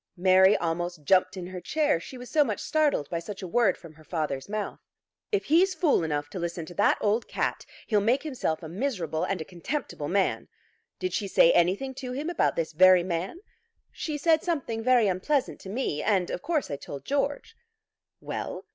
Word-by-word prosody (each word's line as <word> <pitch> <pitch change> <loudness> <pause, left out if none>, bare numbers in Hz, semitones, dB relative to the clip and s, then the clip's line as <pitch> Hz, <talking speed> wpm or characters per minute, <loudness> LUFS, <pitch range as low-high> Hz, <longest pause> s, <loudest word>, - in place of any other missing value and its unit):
Mary 190 +2 +5
almost 175 -1 -3
jumped 190 +4 +3
in 180 - -5
her 180 0 -7
chair, 300 - +1
she 255 +9 -10
was 245 0 -9
so 295 +5 +4
much 220 -7 -3
startled 295 - +1
by 170 - -1
such 195 +3 -8
a - - -4
word 205 +1 +2
from 165 -2 -13
her 155 0 -18
father's 155 -3 -3
mouth. 210 0 -4 0.5
"If 415 - 0
he's 360 +5 +3
fool 305 - +2
enough 145 -2 -2
to 185 - -5
listen 170 -1 -4
to 175 - -10
that 200 - +3
old 215 +3 +1
cat, - - -2 0.2
he'll 210 -2 +2
make 245 +7 +2
himself 250 - -2
a - - -5
miserable 175 - -2
and 195 - -1
a - - -5
contemptible 180 - -4
man. 190 +3 0 0.5
Did 370 - -3
she 205 - -1
say 170 - +5
anything 195 +10 +2
to 250 -1 -5
him 295 +6 -3
about 345 - +1
this 165 -1 -2
very 185 +2 +6
man?" 180 - -3 0.5
"She 305 -2 -4
said 320 +1 +3
something 275 -10 -2
very 245 -3 +4
unpleasant 200 +10 0
to 190 - -10
me, 200 - -2
and 190 -4 +1
of - - -4
course 320 - -1
I 140 - -2
told 140 -1 -9
George." 285 +1 -2 0.6
"Well?" - - -5
195 Hz, 200 wpm, -27 LUFS, 170-270 Hz, 0.6 s, very